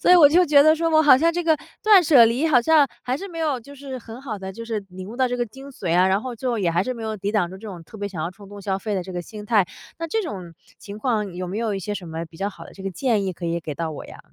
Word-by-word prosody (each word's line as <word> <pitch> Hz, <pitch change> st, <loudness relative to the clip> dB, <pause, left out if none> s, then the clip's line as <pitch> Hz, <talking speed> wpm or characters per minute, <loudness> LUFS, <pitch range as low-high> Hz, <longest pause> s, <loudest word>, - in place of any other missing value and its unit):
所 -, -, +3 dB
以 360 Hz, -, +9 dB
我 310 Hz, -5 st, +8 dB
就 350 Hz, +5 st, +5 dB
觉 290 Hz, -3 st, +6 dB
得 310 Hz, +2 st, +6 dB
说 330 Hz, +1 st, 0 dB
我 315 Hz, -1 st, +5 dB
好 290 Hz, -4 st, +8 dB
像 330 Hz, +5 st, +2 dB
这 350 Hz, +1 st, -1 dB
个 320 Hz, -1 st, +4 dB, 0.3 s
断 415 Hz, -4 st, +7 dB
舍 285 Hz, -7 st, +7 dB
离 240 Hz, +7 st, +1 dB
好 250 Hz, -5 st, +5 dB
像 300 Hz, +1 st, +4 dB
还 250 Hz, +1 st, -1 dB
是 395 Hz, +6 st, -7 dB
没 335 Hz, -3 st, -8 dB
有， 295 Hz, -6 st, 0 dB
就 285 Hz, +5 st, -13 dB
是 270 Hz, -1 st, -7 dB
很 230 Hz, +1 st, -10 dB
好 240 Hz, -6 st, -5 dB
地 190 Hz, 0 st, -6 dB
就 230 Hz, +4 st, -8 dB
是 220 Hz, -3 st, -3 dB
领 185 Hz, +1 st, -9 dB
悟 230 Hz, -, -8 dB
到 260 Hz, 0 st, +2 dB
这 245 Hz, -, -2 dB
个 240 Hz, -, -1 dB
精 270 Hz, +5 st, -12 dB
髓 175 Hz, -10 st, -1 dB
啊， 185 Hz, +1 st, +5 dB
然 190 Hz, +1 st, +2 dB
后 255 Hz, +1 st, -5 dB
就， 240 Hz, 0 st, -2 dB
也 190 Hz, -4 st, +1 dB
还 170 Hz, +2 st, +1 dB
是 255 Hz, -, -2 dB
没 230 Hz, -2 st, -7 dB
有 220 Hz, -1 st, -3 dB
抵 200 Hz, 0 st, -3 dB
挡 205 Hz, -5 st, +1 dB
住 190 Hz, -, -9 dB
这 215 Hz, +3 st, -9 dB
种 175 Hz, -4 st, -9 dB
特 220 Hz, -, -13 dB
别 205 Hz, -1 st, -4 dB
想 185 Hz, -5 st, -6 dB
要 165 Hz, -, -1 dB
冲 195 Hz, +1 st, -15 dB
动 205 Hz, 0 st, -10 dB
消 195 Hz, -1 st, -1 dB
费 205 Hz, +1 st, -3 dB
的 185 Hz, -, -3 dB
这 185 Hz, -, -8 dB
个 175 Hz, -, -4 dB
心 210 Hz, +3 st, -10 dB
态。 210 Hz, -3 st, +4 dB, 0.4 s
那 330 Hz, -, -3 dB
这 445 Hz, -, 0 dB
种 190 Hz, -, -6 dB, 0.3 s
情 205 Hz, +1 st, -9 dB
况 215 Hz, -6 st, -1 dB
有 180 Hz, +1 st, -4 dB
没 190 Hz, +4 st, -4 dB
有 225 Hz, -3 st, -1 dB
一 -, -, -3 dB
些 205 Hz, +2 st, -4 dB
什 190 Hz, -3 st, -7 dB
么 165 Hz, +1 st, -4 dB
比 160 Hz, 0 st, -16 dB
较 200 Hz, +3 st, -2 dB
好 -, -, -12 dB
的 -, -, -13 dB
这 195 Hz, -, -11 dB
个 195 Hz, -, -3 dB
建 210 Hz, +1 st, 0 dB
议 190 Hz, -, -2 dB
可 175 Hz, 0 st, -6 dB
以 170 Hz, 0 st, -1 dB
给 155 Hz, -, -5 dB
到 160 Hz, 0 st, -3 dB
我 150 Hz, -, -8 dB
呀？ -, -, -12 dB
220 Hz, 370 characters per minute, -23 LUFS, 190-275 Hz, 0.4 s, 以